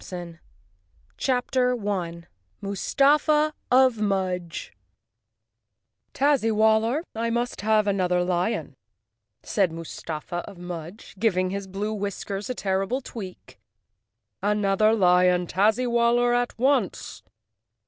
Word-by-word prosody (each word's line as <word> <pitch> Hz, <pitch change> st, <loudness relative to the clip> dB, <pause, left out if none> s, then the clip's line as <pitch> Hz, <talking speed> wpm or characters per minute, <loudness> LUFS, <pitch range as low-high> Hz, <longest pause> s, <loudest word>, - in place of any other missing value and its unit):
285 175 Hz, -2 st, -8 dB, 0.8 s
Chapter 250 Hz, -1 st, +1 dB
1 180 Hz, -6 st, -3 dB, 0.3 s
Mustafa 295 Hz, -, +2 dB, 0.2 s
of 255 Hz, -3 st, +4 dB
Mudge 185 Hz, -4 st, -2 dB, 1.4 s
"rriAZZ 280 Hz, -3 st, +3 dB
y -, -, +3 dB
WALLER, 220 Hz, +6 st, +2 dB
I 230 Hz, +1 st, -2 dB
must 240 Hz, +1 st, -2 dB
have 215 Hz, 0 st, +3 dB
another 180 Hz, -3 st, +1 dB
lion," 180 Hz, +4 st, -1 dB, 0.7 s
said 195 Hz, -6 st, +1 dB
Mustafa 165 Hz, 0 st, -6 dB
of 195 Hz, -, -13 dB
Mudge, 175 Hz, +2 st, -8 dB
giving 185 Hz, -4 st, +1 dB
his 200 Hz, 0 st, -4 dB
blue 200 Hz, +3 st, -3 dB
whiskers 200 Hz, +1 st, -4 dB
a 255 Hz, -, -2 dB
terrible 195 Hz, +6 st, -1 dB
tweak. 195 Hz, -7 st, -10 dB, 0.8 s
"Another 210 Hz, +1 st, +2 dB
lion, 180 Hz, -3 st, +4 dB
Tazzy 215 Hz, +8 st, +2 dB
waller, 240 Hz, +1 st, +3 dB
at 245 Hz, 0 st, 0 dB
once!" 255 Hz, -, 0 dB
205 Hz, 105 wpm, -25 LUFS, 180-240 Hz, 1.4 s, of